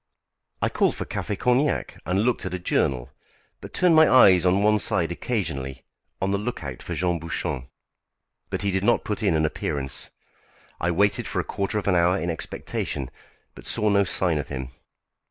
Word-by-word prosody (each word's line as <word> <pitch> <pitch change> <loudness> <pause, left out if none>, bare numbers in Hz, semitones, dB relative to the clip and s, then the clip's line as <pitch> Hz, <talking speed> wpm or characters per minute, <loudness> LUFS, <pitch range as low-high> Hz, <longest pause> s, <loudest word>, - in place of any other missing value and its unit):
I - - +3
called - - +1
for - - -4
café 105 -2 -3
cognac 125 +6 0
and 95 +4 +1
looked 125 +1 +1
at - - -3
a - - -2
journal, 70 -7 0 0.5
but - - -10
turned 180 -3 +4
my 160 0 +7
eyes 95 -8 +7
on 95 +3 +3
one 105 0 +4
side 85 -3 0
occasionally, 70 - -3 0.4
on 95 +1 0
the 100 - +1
look 110 -3 -4
out 65 -3 -6
for - - -5
Jean 85 -1 0
Bouchon. 75 -5 -3 0.8
But - - -2
he 100 - +1
did 95 0 -1
not 120 +3 +3
put 105 - -2
in 100 -6 +2
an 80 0 +2
appearance. 70 -3 -2 0.7
I 85 - 0
waited 100 +4 +2
for - - -2
a - - 0
quarter 100 +2 -2
of 105 - -3
an 100 - +3
hour 90 +2 +3
in 85 -2 -2
expectation, 70 -4 -4 0.4
but - - -11
saw 105 - +2
no 100 0 +4
sign 90 -4 +1
of 75 - -4
him. 65 -2 -5
90 Hz, 190 wpm, -25 LUFS, 80-105 Hz, 0.8 s, my